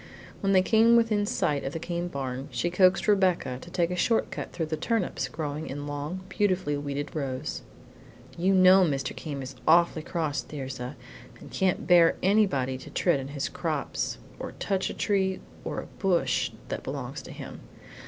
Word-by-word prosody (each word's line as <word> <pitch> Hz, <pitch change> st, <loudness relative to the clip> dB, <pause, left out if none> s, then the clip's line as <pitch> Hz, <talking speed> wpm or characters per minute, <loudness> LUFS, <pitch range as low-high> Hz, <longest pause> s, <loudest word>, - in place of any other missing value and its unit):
When 195 Hz, -, +1 dB
they 185 Hz, -1 st, +5 dB
came 225 Hz, +3 st, +5 dB
within 215 Hz, -3 st, +3 dB
sight 150 Hz, -, 0 dB
of 135 Hz, -, -4 dB
the 165 Hz, -, -3 dB
Came 175 Hz, +1 st, -3 dB
barn, 135 Hz, -4 st, -4 dB
she 175 Hz, -, -1 dB
coaxed 185 Hz, +2 st, +4 dB
Rebecca 185 Hz, -10 st, +2 dB
to 175 Hz, -, -11 dB
take 175 Hz, -1 st, 0 dB
a -, -, -1 dB
short 225 Hz, +5 st, +1 dB
cut -, -, -5 dB
through 165 Hz, -2 st, -2 dB
the 155 Hz, 0 st, -2 dB
turnips 210 Hz, +4 st, -1 dB
growing 150 Hz, 0 st, -4 dB
in 145 Hz, +2 st, -5 dB
long, 145 Hz, +5 st, -4 dB
beautifully 190 Hz, -7 st, 0 dB
weeded 145 Hz, +2 st, -4 dB
rows. 135 Hz, -1 st, -3 dB, 0.7 s
"You 190 Hz, +3 st, +2 dB
know 185 Hz, +1 st, +7 dB
Mr. 135 Hz, -6 st, -1 dB
Came 140 Hz, -4 st, -5 dB
is 130 Hz, +1 st, -7 dB
awfully 170 Hz, 0 st, +5 dB
cross, 155 Hz, -3 st, -2 dB
Thirza, 130 Hz, -2 st, -6 dB, 0.4 s
and -, -, -12 dB
can't 190 Hz, -1 st, 0 dB
bear 175 Hz, -2 st, +6 dB
anybody 180 Hz, -11 st, +2 dB
to 150 Hz, -, -10 dB
tread 165 Hz, +1 st, +2 dB
on 135 Hz, -, -5 dB
his 140 Hz, -1 st, -3 dB
crops -, -, -2 dB, 0.2 s
or -, -, -6 dB
touch 195 Hz, -2 st, -1 dB
a -, -, -6 dB
tree 190 Hz, -2 st, +1 dB, 0.2 s
or -, -, -3 dB
a -, -, -10 dB, 0.2 s
bush 170 Hz, -10 st, +2 dB, 0.2 s
that -, -, -3 dB
belongs -, -, -5 dB
to -, -, -11 dB
him. -, -, -8 dB
170 Hz, 180 wpm, -27 LUFS, 145-190 Hz, 0.7 s, know